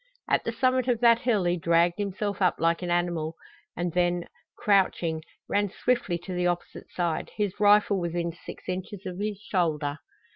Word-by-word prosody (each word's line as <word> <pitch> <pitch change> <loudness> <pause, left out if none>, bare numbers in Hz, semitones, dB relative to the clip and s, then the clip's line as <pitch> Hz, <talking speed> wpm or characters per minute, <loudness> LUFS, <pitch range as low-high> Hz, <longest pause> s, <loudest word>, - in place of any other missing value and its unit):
At - - +1
the - - 0
summit 255 -1 +1
of 240 -3 +2
that 235 -1 +6
hill 235 -6 +1
he 175 0 +1
dragged 170 +2 +2
himself 205 0 -2
up 180 - +4
like 165 +1 +1
an 175 - -3
animal, 170 -2 0 0.4
and 175 -1 -2
then, 175 -1 +1 0.3
crouching, 180 -5 +2 0.3
ran 205 0 +1
swiftly 220 -4 0
to 185 - -5
the 180 0 +1
opposite 175 0 -4
side, 170 -3 -2
his 205 -2 -1
rifle 205 -1 +5
within 170 0 -2
six 170 - -11
inches 185 +2 -5
of 185 0 -5
his 210 0 -2
shoulder. 155 -7 -1
180 Hz, 175 wpm, -27 LUFS, 170-205 Hz, 0.4 s, that